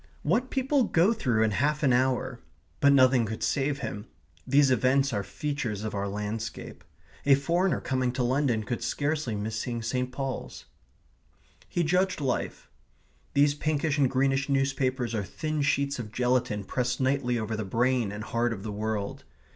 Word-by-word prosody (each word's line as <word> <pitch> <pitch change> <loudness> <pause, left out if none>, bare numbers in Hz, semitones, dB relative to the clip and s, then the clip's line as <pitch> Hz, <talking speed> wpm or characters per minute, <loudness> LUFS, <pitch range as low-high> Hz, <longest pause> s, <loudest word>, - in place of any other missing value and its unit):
(What 255 +3 +1
people 270 0 +1
go 180 +6 +3
through 120 - +1
in 110 - +2
half 150 +8 0
an 130 -3 +4
hour! 130 0 +1 0.4
But 140 - +5
nothing 130 -3 +5
could 110 +1 -5
save 140 0 0
him. 105 -4 -5 0.4
These 140 -1 +4
events 130 +2 +2
are 100 - 0
features 115 -1 -3
of 110 - -4
our 100 0 -2
landscape. 105 +2 -5 0.4
A 140 -1 +6
foreigner 170 +7 +1
coming 130 -1 0
to 130 - -1
London 125 -3 +1
could 115 +3 -3
scarcely 145 -5 -1
miss 110 +2 -3
seeing 120 0 -3
St. 125 +2 -1
Paul's.) 135 0 -5 1.0
He 175 - 0
judged 180 +3 +1
life. 135 -4 -2 0.7
These 145 +1 +5
pinkish 150 0 -1
and 135 -3 +4
greenish 135 +1 +1
newspapers 130 -3 0
are 105 -3 -1
thin 155 - -3
sheets 140 -1 +1
of 110 -3 -6
gelatine 125 -4 0
pressed 125 +4 -2
nightly 130 -2 +1
over 110 0 -2
the 110 - -3
brain 120 +2 +1
and 105 +1 -6
heart 115 +1 0
of 100 -3 -8
the 110 - -4
world. 105 -1 -3
130 Hz, 165 wpm, -28 LUFS, 110-140 Hz, 1.0 s, A